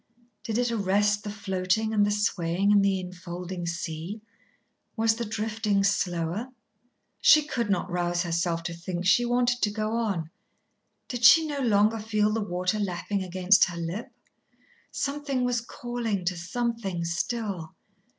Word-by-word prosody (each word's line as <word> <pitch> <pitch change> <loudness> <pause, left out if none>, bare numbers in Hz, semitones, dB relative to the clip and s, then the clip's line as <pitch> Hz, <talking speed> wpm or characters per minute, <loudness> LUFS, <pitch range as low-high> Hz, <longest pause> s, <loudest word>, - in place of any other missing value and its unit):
Did 220 -1 -2
it 245 -1 +1
arrest 205 -1 +1
the 210 - -5
floating 200 +1 -1
and 210 -1 +4
the 205 - +2
swaying 200 -2 +1
in 205 -1 +6
the 195 -1 +2
enfolding 180 -1 -6
sea? 170 +4 -4 0.8
Was 225 -1 +3
the 235 +1 -3
drifting 215 -1 -1
slower? 180 +2 0 0.7
She 305 -1 +7
could 235 -7 -2
not 185 -3 0
rouse 175 -1 -1
herself 170 -1 -1
to 175 - -4
think, 175 +1 -5
she 240 +6 +4
wanted 245 0 +1
to 210 - +3
go 215 +1 -2
on. 200 -9 -1 0.8
Did 245 -2 -5
she 320 +6 +8
no 290 -2 -3
longer 220 -2 +3
feel 215 -1 +1
the 225 - 0
water 180 +1 -1
lapping 200 +1 -2
against 185 +2 +4
her 175 -1 -7
lip? 170 +6 -5 0.8
Something 280 -2 -2
was 245 -1 +1
calling 235 -5 -4
to 180 +1 0
Something 195 -1 -3
still. 180 0 -3
205 Hz, 150 wpm, -27 LUFS, 180-225 Hz, 0.8 s, she